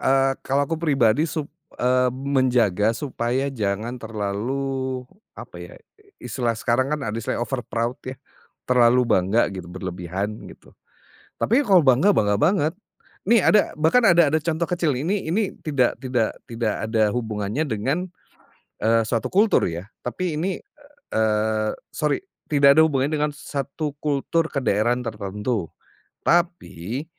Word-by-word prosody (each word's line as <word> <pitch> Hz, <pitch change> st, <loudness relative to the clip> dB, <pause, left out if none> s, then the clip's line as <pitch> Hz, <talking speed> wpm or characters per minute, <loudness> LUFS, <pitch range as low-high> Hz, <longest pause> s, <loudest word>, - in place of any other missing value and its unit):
eee, 135 Hz, 0 st, +3 dB
kalau 140 Hz, +2 st, 0 dB
aku 165 Hz, +2 st, -4 dB
pribadi 140 Hz, -1 st, +2 dB
suk 155 Hz, 0 st, -3 dB, 0.3 s
eee, 125 Hz, +1 st, +2 dB
menjaga 125 Hz, -5 st, +1 dB
supaya 130 Hz, +1 st, -2 dB
jangan 110 Hz, +1 st, -3 dB
terlalu 125 Hz, +5 st, -3 dB, 0.3 s
apa -, -, -10 dB
ya, -, -, -10 dB, 0.4 s
istilah 120 Hz, -3 st, -2 dB
sekarang 130 Hz, +6 st, 0 dB
kan -, -, -8 dB
ada 105 Hz, -, -3 dB
istilah 115 Hz, +1 st, -2 dB
overproud 120 Hz, 0 st, -3 dB
ya 130 Hz, -, -5 dB, 0.5 s
terlalu 125 Hz, 0 st, +4 dB
bangga 105 Hz, -1 st, +2 dB
gitu, 90 Hz, -2 st, -7 dB
berlebihan 95 Hz, +2 st, -4 dB, 0.2 s
gitu. -, -, -16 dB, 0.7 s
Tapi 245 Hz, +6 st, +2 dB
kalau 200 Hz, -8 st, +5 dB
bangga, 140 Hz, +4 st, +4 dB
bangga 105 Hz, -, +2 dB
banget. 155 Hz, -, +2 dB, 0.6 s
Nih 230 Hz, -5 st, +5 dB
ada 210 Hz, -6 st, +3 dB
bahkan 165 Hz, +11 st, +4 dB
ada 175 Hz, -6 st, +6 dB
ada 155 Hz, +2 st, +1 dB
contoh 165 Hz, +1 st, -1 dB
kecil, 175 Hz, -3 st, 0 dB
ini 185 Hz, +9 st, -1 dB
ini 200 Hz, +2 st, 0 dB
tidak 140 Hz, -6 st, +1 dB
tidak 125 Hz, -4 st, 0 dB, 0.2 s
tidak 115 Hz, -2 st, -2 dB
ada 110 Hz, -1 st, +1 dB
hubungannya 110 Hz, +1 st, -2 dB
dengan, 140 Hz, -, -2 dB, 0.7 s
eee, 115 Hz, 0 st, +3 dB
suatu 115 Hz, -1 st, -1 dB
kultur 205 Hz, -, +3 dB
ya 85 Hz, +3 st, -6 dB, 0.2 s
tapi 165 Hz, +6 st, -3 dB
ini, 180 Hz, +5 st, -2 dB, 0.6 s
eee, 110 Hz, 0 st, +1 dB, 0.2 s
sorry, 150 Hz, -, 0 dB, 0.3 s
tidak 140 Hz, -2 st, +6 dB
ada -, -, +9 dB
hubungannya 140 Hz, 0 st, 0 dB
dengan 150 Hz, 0 st, +1 dB
satu 140 Hz, +1 st, -4 dB
kultur 155 Hz, +3 st, 0 dB
kedaerahan 120 Hz, -2 st, 0 dB
tertentu, 105 Hz, -3 st, -3 dB, 0.6 s
tapi 140 Hz, -, 0 dB
125 Hz, 135 wpm, -23 LUFS, 110-150 Hz, 0.7 s, ada